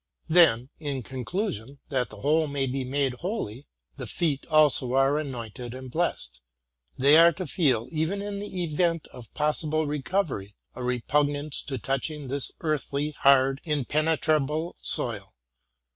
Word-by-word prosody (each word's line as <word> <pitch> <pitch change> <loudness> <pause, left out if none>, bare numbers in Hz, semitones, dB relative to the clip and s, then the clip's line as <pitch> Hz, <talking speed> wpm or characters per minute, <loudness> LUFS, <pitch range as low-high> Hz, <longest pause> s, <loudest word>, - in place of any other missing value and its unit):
Then, 145 -7 +5
in 140 -4 -4
conclusion, 135 - -4
that 130 -3 -1
the 105 -1 -11
whole 155 +2 +2
may 140 -1 -1
be 135 +1 -2
made 135 0 0
holy, 150 - -4 0.3
the 130 -3 -6
feet 145 - -1
also 150 -5 +4
are 135 +2 +3
anointed 120 -3 -6
and 130 -1 -9
blessed. 170 - -2 0.6
They 140 +4 +6
are 170 +1 +8
to 185 +3 -5
feel, 135 - +1
even 160 +5 -1
ia 205 +1 -4
the 200 -3 -4
event 165 0 0
of 120 -3 -12
possible 155 +1 +1
recovery, 145 - -2 0.2
a 125 - -8
repugnance 145 +4 0
to 135 -3 -4
touching 135 +3 -3
this 140 0 +2
earthly, 150 -1 -1
hard, 135 -1 +3
impenetrable 155 +1 0
soil. - - -2
145 Hz, 140 wpm, -26 LUFS, 130-155 Hz, 0.6 s, are